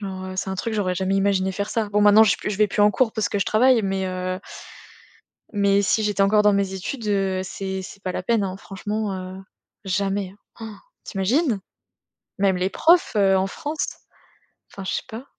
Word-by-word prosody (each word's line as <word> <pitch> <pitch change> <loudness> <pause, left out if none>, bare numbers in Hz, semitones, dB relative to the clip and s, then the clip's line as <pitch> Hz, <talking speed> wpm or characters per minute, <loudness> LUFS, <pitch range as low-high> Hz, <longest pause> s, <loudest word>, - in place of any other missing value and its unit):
Genre, 190 -2 -6
heu, 185 - -7
c'est 190 - -2
un 190 - -2
truc 225 +4 -3
j'aurais 195 -4 0
jamais 190 +2 0
imaginé 195 -1 +1
faire 200 +2 -3
ça. 220 -3 -2
Bon 210 0 +2
maintenant 205 +1 +7
je 220 - +4
suis - - +1
p - - -4
je 210 - -2
vais 210 +1 +4
plus 205 - -2
en 205 0 +6
cours 225 +1 +1
parce 220 -2 -1
que 205 - -2
je 195 - +1
travaille 240 +1 +4
mais, 195 -1 -1
heu 185 0 -3 1.1
mais 200 -1 +3
si 215 +2 +1
j'étais 205 -2 0
encore 210 +2 +4
dans 210 -1 +5
mes 195 -1 0
études, 215 +5 -5
heu, 195 -2 0
c'est 190 0 -5
c'est 195 +1 -11
pas 185 - -2
la - - -3
peine, 225 +1 +1
hein, 190 -1 -3
franchement, 205 +2 -4
heu, 185 0 -7 0.5
jamais, 195 0 -1 0.3
hein. 225 - -6
Han. 210 - -10 0.3
Tu 195 - -8
imagines? 230 - +1 0.8
Même 195 -2 +2
les 185 +1 0
profs, 340 - +3
heu, 195 -2 +4
en 190 0 +1
France? 300 +9 -4 0.9
Enfin 195 - -8
je - - -2
sais - - -2
pas. 230 +1 -8
200 Hz, 220 wpm, -23 LUFS, 190-210 Hz, 1.1 s, maintenant